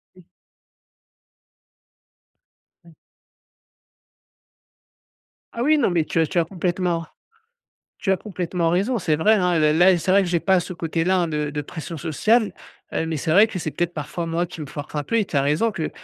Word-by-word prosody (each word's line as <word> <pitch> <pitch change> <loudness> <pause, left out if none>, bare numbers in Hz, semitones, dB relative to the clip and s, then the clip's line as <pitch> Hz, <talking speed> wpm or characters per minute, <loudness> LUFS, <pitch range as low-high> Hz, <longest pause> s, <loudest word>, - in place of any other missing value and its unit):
Oui. 185 - -18 2.6
Mmh. 170 - -17 2.6
Ah 235 - -2
oui, 305 +3 +4
non 290 - +2
mais 170 -3 +1
tu 165 - -2
as 160 - +3
tu 175 - 0
as 165 - +1
complètement 175 -1 -2 1.0
tu 195 - +1
as - - +2
complètement 180 -4 -2
raison, 200 +8 +1
c'est 160 -3 +1
vrai, 210 +8 +4
hein, 180 -4 +2
là 155 -1 +3
là 175 +3 +5
c'est 185 +3 0
vrai 200 +1 +5
que 185 - -3
j'ai 175 -1 +1
pas 190 +2 +2
ce 180 - -6
côté-là, 170 +2 0
hein, 170 - -1
de 150 -1 -2
de 150 0 -3
pression 165 +3 -7
sociale, 210 - +1 0.4
heu, 165 - -1
mais 160 -1 -2
c'est 155 +2 -1
vrai 205 +6 +6
que 210 - -5
c'est 155 -3 -4
peut-être 175 0 -2
parfois 150 +2 -5
moi 165 +2 -1
qui 170 -1 -10
me 150 - -5
force 145 +2 -8
un 150 - -1
peu 230 +11 0
et 215 - +2
tu 170 - -5
as 140 - +3
raison 150 +11 +1
que, 160 -5 -3
170 Hz, 190 wpm, -22 LUFS, 160-190 Hz, 2.6 s, vrai